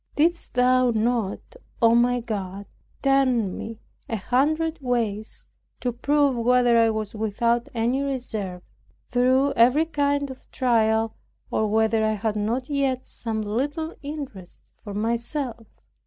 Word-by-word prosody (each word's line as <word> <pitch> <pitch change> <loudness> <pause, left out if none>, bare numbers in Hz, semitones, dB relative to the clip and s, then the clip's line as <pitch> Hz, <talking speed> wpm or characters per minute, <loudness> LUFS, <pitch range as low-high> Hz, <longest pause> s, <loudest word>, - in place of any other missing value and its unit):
Didst 335 +1 +1
thou 255 0 +4
not, 230 - -1 0.2
O 230 -1 +5
my 245 +1 +3
God, 200 -3 -5 0.4
turn 255 -7 +2
me 225 0 -6 0.3
a 225 - -1
hundred 310 - +1
ways, 225 -4 -2 0.3
to 250 - -1
prove 280 +3 +2
whether 245 -1 +4
I 230 0 +5
was 215 -2 -3
without 230 +2 0
any 240 +4 +1
reserve, 220 -10 -3 0.5
through 260 +3 +3
every 255 +7 +4
kind 285 -3 0
of 260 - -13
trial, 225 -3 +1 0.4
or 215 - +1
whether 220 +1 +2
I 215 0 +2
had 215 0 -2
not 230 +5 -1
yet 275 -3 -1
some 220 -2 -3
little 290 +10 -2
interest 280 - -8 0.2
for 205 -2 -7
myself? 235 +2 -2
240 Hz, 130 wpm, -24 LUFS, 220-270 Hz, 0.5 s, O